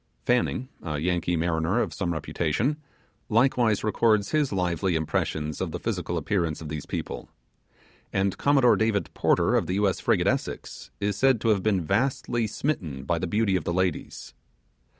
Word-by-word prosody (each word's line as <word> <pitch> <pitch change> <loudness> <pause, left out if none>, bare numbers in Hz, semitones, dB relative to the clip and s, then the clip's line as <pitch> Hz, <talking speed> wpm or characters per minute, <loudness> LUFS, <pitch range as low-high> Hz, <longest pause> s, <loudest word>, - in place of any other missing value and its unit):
Fanning, 125 +1 +1
a 75 -3 -3
Yankee 85 +2 0
mariner 80 +5 +1
of - - -1
some 90 -3 -2
reputation, 85 - -1 0.5
likewise 115 -2 +3
records 110 -1 +2
his 150 -3 +1
lively 90 -1 0
impressions 75 -1 -2
of - - -1
the - - -5
physical - - -2
appearance 85 -6 -1
of 80 - -7
these 75 -1 -5
people; - - -5 0.8
and 95 0 0
Commodore 135 -4 +5
David 110 -2 0
Porter - - +2
of - - +1
the 90 - -1
U.S. 100 -2 +1
frigate - - +2
Essex, 65 - -2
is 100 -1 0
said 130 0 +4
to 115 - +1
have 105 -3 +3
been 95 -3 +1
vastly 120 - 0
smitten 90 - -3
by 85 +4 0
the 90 - -2
beauty 105 +1 +1
of 90 - 0
the 85 - -2
ladies. 95 -2 -2
95 Hz, 165 wpm, -26 LUFS, 85-115 Hz, 0.8 s, Commodore